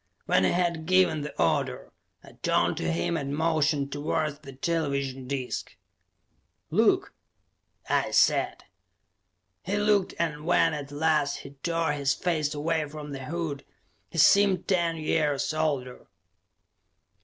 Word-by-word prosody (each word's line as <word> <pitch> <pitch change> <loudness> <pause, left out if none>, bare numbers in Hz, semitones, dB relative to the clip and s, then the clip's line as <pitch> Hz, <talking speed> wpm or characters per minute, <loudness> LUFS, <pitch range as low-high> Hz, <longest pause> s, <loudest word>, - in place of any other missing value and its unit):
When 95 - +3
he - - +3
had 170 -2 0
given 185 -4 +3
the 150 - -7
order, 80 -6 0 0.3
I - - -14
turned - - +2
to 80 -1 -1
him 85 - -1
and 140 -2 -3
motioned 155 -3 +1
towards 145 0 -2
the 140 - -11
television 140 -3 -2
disc. 130 -2 -4 1.0
"Look," - - +2 0.7
I - - +1
said. - - +2 1.0
He 200 +4 -2
looked, 205 -2 +2
and 150 -3 -2
when 165 -1 +3
at 145 -1 -6
last 150 -1 +1
he 140 - -10
tore 165 -2 0
his 140 -2 0
face 155 -3 -1
away 155 0 -1
from 150 -1 -8
the 135 -1 -6
hood, 155 -2 -4 0.5
he - - -9
seemed 195 +2 +5
ten 170 -3 +1
years 155 -2 0
older. 140 -5 -2
150 Hz, 130 wpm, -27 LUFS, 140-165 Hz, 1.0 s, seemed